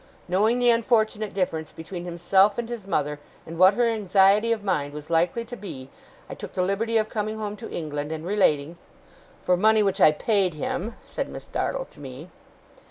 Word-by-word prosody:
Knowing 210 +7 +2
the 245 -1 +4
unfortunate 220 -2 +1
difference 160 -5 -2
between 175 +2 -8
himself 190 +4 +3
and 240 -1 -3
his 230 -5 -6
mother, 150 -5 -1 0.3
and 165 +1 -8
what 185 +2 +7
her 240 - +2
anxiety 205 0 +3
of 220 -3 -1
mind 145 -8 -1
was 150 +2 -9
likely 175 +8 +1
to 245 +2 -8
be, 135 - -9 0.4
I - - -7
took - - -9
the 185 - 0
liberty 220 +5 0
of 215 -1 +1
coming 215 0 -3
home 210 -1 -4
to 230 - -8
England, 150 -2 -4
and 160 0 -5
relating 170 -5 +1 0.3
' - - -27
'For 180 - +3
money 215 +3 +4
which 195 -1 0
I 155 - +8
paid 190 +1 0
him,' 190 +8 -3
said - - -5
Miss - - -9
Dartle - - -2
to - - -18
me. 140 +4 -9
195 Hz, 195 wpm, -25 LUFS, 165-220 Hz, 0.4 s, I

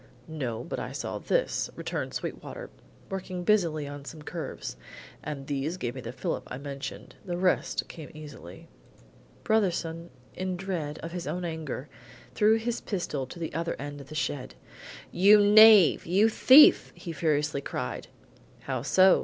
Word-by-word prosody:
"No, 125 -8 -4
but - - -5
I - - -5
saw - - -4
this," - - 0
returned - - -4
Sweetwater, - - -6 0.4
working 185 -2 -4
busily 170 -7 +2
on 145 0 -8
some 155 +2 -10
curves; 165 +2 -6 0.5
"and 140 -2 -6
these 145 +5 -2
gave 120 -9 -3
me 130 - -7
the 115 - -6
fillip 130 +1 -3
I 125 - -6
mentioned. 140 0 -7
The 175 -2 -4
rest 180 0 0
came 160 -4 -10
easily." 145 - -11 0.8
Brotherson, 170 -6 0 0.2
in 185 0 -3
dread 175 -6 -4
of 165 - -5
his 175 0 -5
own 180 0 -3
anger, 160 -4 -5 0.5
threw 215 +1 +4
his 230 +1 -2
pistol 150 - -3
to 175 - -10
the 165 -2 -5
other 165 +2 -2
end 145 0 -7
of 140 - -14
the 155 - -8
shed: 145 -3 -3 0.6
"You 200 +4 +6
knave! 210 -4 +7
You 200 +6 +4
thief!" 265 +6 +7
he 170 - -7
furiously 150 -3 0
cried. - - -5 0.5
"How 130 -3 -3
so?" 185 +8 +5
165 Hz, 155 wpm, -28 LUFS, 145-185 Hz, 0.8 s, knave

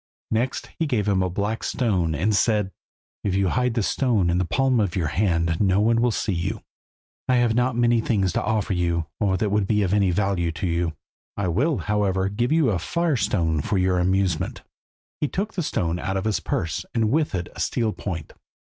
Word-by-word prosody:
Next 120 +4 -1
he 165 - +1
gave 110 -7 0
him 100 -2 +2
a 95 - 0
black 105 +5 -2
stone, 90 -10 0
and 100 +8 +1
said 105 -2 +2 0.5
"If 95 -2 0
you 95 -1 +2
hide 125 +1 0
this 115 -4 +1
stone 110 -10 +1
in 90 - +1
the 90 - +1
palm 130 +5 +2
of 100 -5 0
your 85 -5 0
hand 85 -4 +1
no 95 -1 +3
one 115 +2 +3
will 120 - +3
see 105 -2 -1
you. 85 +2 -3 0.7
I 130 - +4
have 120 -2 +3
not 125 +1 +1
many 120 -1 +3
more - - -9
things 95 -5 +1
to - - 0
offer 110 -2 0
you, 85 -2 0
or 95 -3 +1
that 100 +2 -1
would 105 -2 +1
be 105 0 +2
of 95 0 0
any 100 -2 +3
value 90 -2 0
to 90 +4 -4
you. 85 -1 0 0.4
I 100 -3 0
will, 135 - +1
however, 100 -3 0
give 120 +6 -1
you 155 -7 +3
a 95 - 0
firestone 105 - 0
for 100 +6 -1
your 90 -1 +2
amusement." 95 -2 0 0.6
He 150 - +1
took 205 +8 -3
the 185 - -2
stone 85 - -1
out 95 +1 -2
of 95 - -3
his 110 -2 +1
purse, 80 -3 -2
and 110 -2 +2
with 150 -5 +1
it 85 -1 -3
a - - -9
steel 115 -3 0
point. 85 -6 -6
100 Hz, 215 wpm, -24 LUFS, 90-115 Hz, 0.7 s, I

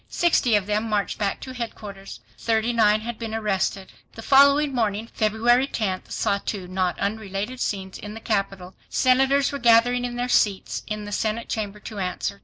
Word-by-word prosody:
Sixty 285 -9 +2
of 205 -2 +1
them 210 +2 -1
marched 205 -1 -1
back 200 -2 -1
to 260 - -7
headquarters. 210 -5 -7
Thirty 225 +1 0
nine 215 -2 +3
had 235 0 -6
been 225 -1 -4
arrested. 195 -3 -1 0.2
The 225 - -10
following 280 +2 +5
morning, 220 -2 -1
February 235 +4 +2
10th, 195 -8 -3
saw 200 -2 0
two 195 -3 -5
not 185 -1 -1
unrelated 210 +3 -3
scenes 190 -4 -3
in 210 +1 -8
the - - -7
capital. 195 -4 -2 0.2
Senators 270 +2 +3
were 280 - -4
gathering 240 +1 +4
in 245 -1 -3
their 245 +1 -2
seats 205 -5 +1
in 215 -1 -4
the 205 - -7
senate 220 +2 -2
chamber 210 -2 -3
to 210 0 -7
answer. 185 +2 -3
215 Hz, 180 wpm, -24 LUFS, 200-240 Hz, 0.2 s, following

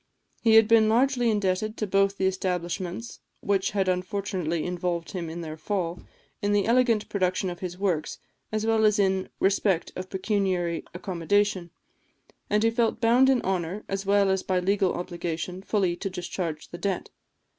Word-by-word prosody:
He 225 -2 +5
had 225 -1 +7
been 220 -1 +5
largely 245 +1 +3
indebted 210 +1 0
to 215 - -1
both 195 0 +2
the 190 - 0
establishments 185 +2 -3 0.2
which 195 -1 +1
had 195 -2 0
unfortunately 185 -3 -1
involved 175 -1 -2
him 175 -4 -4
in 170 +2 -6
their 155 -1 -6
fall, 175 0 -2 0.4
in 205 0 +1
the 205 -1 +2
elegant 230 -2 +3
production 185 -1 0
of 175 - -8
his 180 -1 -5
works, 180 -6 -1 0.3
as 215 0 -1
well 225 -1 +2
as 210 0 +4
in 190 -2 +1
respect 195 -2 +1
of 185 0 -6
pecuniary 185 -4 -1
accommodation; 185 +1 0 0.8
and 210 +1 +2
he 225 - +4
felt 230 -1 +1
bound 245 +3 +5
in 260 -3 +3
honour, 185 +1 -2
as 195 0 -3
well 200 0 +3
as 190 0 +1
by 185 -1 0
legal 195 +1 +1
obligation, 175 0 -4
fully 195 -3 0
to 195 +3 -4
discharge 175 -3 -5
the 175 - -8
debt. 195 -1 -2
190 Hz, 165 wpm, -26 LUFS, 180-210 Hz, 0.8 s, had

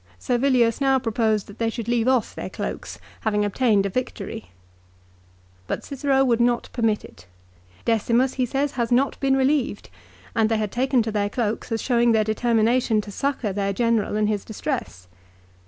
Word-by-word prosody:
Servilius 245 -2 +2
now 270 -1 +4
proposed 220 -4 0
that 200 - -14
they 230 -1 +1
should 225 -1 -5
leave 235 0 +1
off 255 -4 +2
their - - -6
cloaks, - - -5 0.2
having 210 -1 0
obtained 205 -1 +2
a - - 0
victory. 225 0 -5 1.2
But - - -3
Cicero 270 -1 +1
would 235 -2 +2
not 240 0 +1
permit 225 -3 0
it. 90 0 -16 0.6
Decirnus, 235 +3 +2
he 255 -2 0
says, 275 +3 -1
has 235 -2 -2
not 260 +3 +2
been 270 -1 +2
relieved, 265 - 0 0.4
and 220 -1 +3
they 225 - +1
had 210 -2 -2
taken 255 -1 +2
to 220 - -3
their 205 -1 0
cloaks 220 0 -2
as 225 - -1
showing 235 -2 +3
their 220 -1 +3
determination 225 +1 +2
to 205 - -10
succour 250 -3 -2
their 200 0 -1
general 230 -1 +1
in 215 0 +2
his 210 -2 -1
distress. 220 - -5
230 Hz, 170 wpm, -23 LUFS, 215-255 Hz, 1.2 s, now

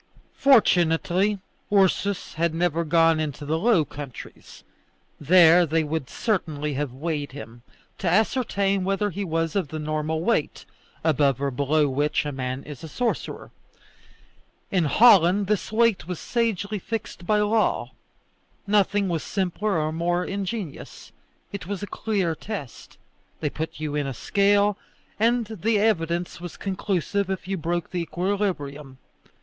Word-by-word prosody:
Fortunately 190 -5 +3 0.3
Ursus 200 -1 +1
had 165 0 0
never 170 -1 +1
gone 165 0 +3
into 150 -1 -4
the 160 +2 0
Low 200 -6 +3
Countries; 140 -2 -10 0.6
there 170 +2 +6
they 165 0 +1
would 150 -3 -3
certainly 155 -9 -2
have 140 -1 -2
weighed 145 +1 -4
him, 120 -2 -10 0.4
to 185 - 0
ascertain 200 -1 +1
whether 195 +2 0
he 200 +4 -4
was 165 -1 -1
of 190 -6 0
the 155 - -6
normal 155 +1 -2
weight, 225 -8 0 0.4
above 145 -4 +2
or 140 0 -1
below 145 +3 +1
which 145 +3 0
a 145 - -2
man 130 0 -4
is 150 +1 -10
a - - -6
sorcerer. 240 - -3 1.2
In 180 -4 +2
Holland 200 +1 +5
this 210 +1 -1
weight 225 -6 +2
was 180 -3 -4
sagely 215 -3 -1
fixed 215 -4 -6
by 210 -1 +3
law. 215 +1 +1 0.7
Nothing 200 0 +2
was 170 -3 -1
simpler 195 0 -1
or 155 0 0
more 175 +2 0
ingenious. 195 -3 -5 0.4
It 190 -4 -6
was 200 0 -4
a - - -1
clear 200 -5 -1
test. 160 - -8 0.4
They 150 -3 -2
put 160 -1 -5
you 155 -1 -3
in 145 -1 -1
a 135 - -4
scale, 200 - +2 0.4
and 235 +2 +2
the 220 +1 0
evidence 175 -5 0
was 175 -1 -8
conclusive 195 0 -2
if 190 -2 -4
you 195 - -1
broke 170 0 -3
the 180 - -2
equilibrium. 170 -7 -3
175 Hz, 145 wpm, -24 LUFS, 155-200 Hz, 1.2 s, there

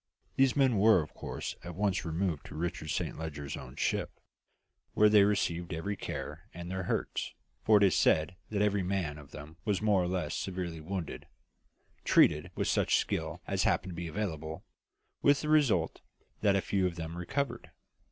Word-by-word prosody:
These 135 -1 +4
men 130 -7 +3
were 105 -5 +6
of 75 - -13
course - - -5
at 85 -1 -7
once 100 -1 0
removed 80 -1 -2
to - - -10
Richard 80 -1 -3
Saint 75 - -2
Leger's 75 -3 -5
own 65 -2 -9
ship, - - 0 0.9
where 105 0 +6
they 105 -1 +7
received 85 -4 0
every 100 +6 -3
care, - - -6
and 85 +1 -6
their 95 -1 -3
hurts - - -2 0.3
for 110 -1 +5
it 100 - +4
is 95 -4 +5
said 80 +3 +3
that 105 -1 +1
every 100 -1 +2
man 90 -5 -2
of 70 -2 -13
them 75 +2 -10
was 105 -3 +1
more 105 -3 +3
or 90 - 0
less 90 -4 -2
severely 90 -4 -4
wounded 90 +1 -5 0.8
treated - - +4
with - - -1
such - - +2
skill - - -2
as - - -1
happened 95 - +1
to - - -6
be 85 0 -4
available, 80 -2 -4 0.6
with 140 -1 +4
the 150 - -3
result 150 -6 +3 0.4
that 100 -2 +4
a 100 - +2
few 95 +1 +1
of 85 - -5
them 80 -1 -5
recovered. 130 +11 -3
90 Hz, 180 wpm, -31 LUFS, 80-105 Hz, 0.9 s, they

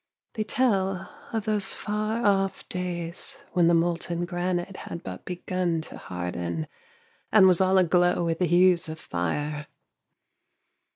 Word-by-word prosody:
They 215 - -1
tell 195 -6 0 0.2
of 225 -2 -2
those 210 -3 +1
far 215 +2 -2
off 195 -1 +1
days 175 -2 -3 0.2
when 175 -2 +4
the 170 - +5
molten 170 +1 0
granite 175 +1 -2
had 170 - -7
but 90 -1 -7
begun 180 -1 -1
to - - -9
harden, 90 - -4 0.7
and 205 -3 +7
was 185 -1 +5
all 190 0 +4
aglow 175 -1 +3
with 165 -1 -1
the 180 - +3
hues 175 0 +4
of 155 - -5
fire. 145 - -3
175 Hz, 135 wpm, -26 LUFS, 165-190 Hz, 0.7 s, and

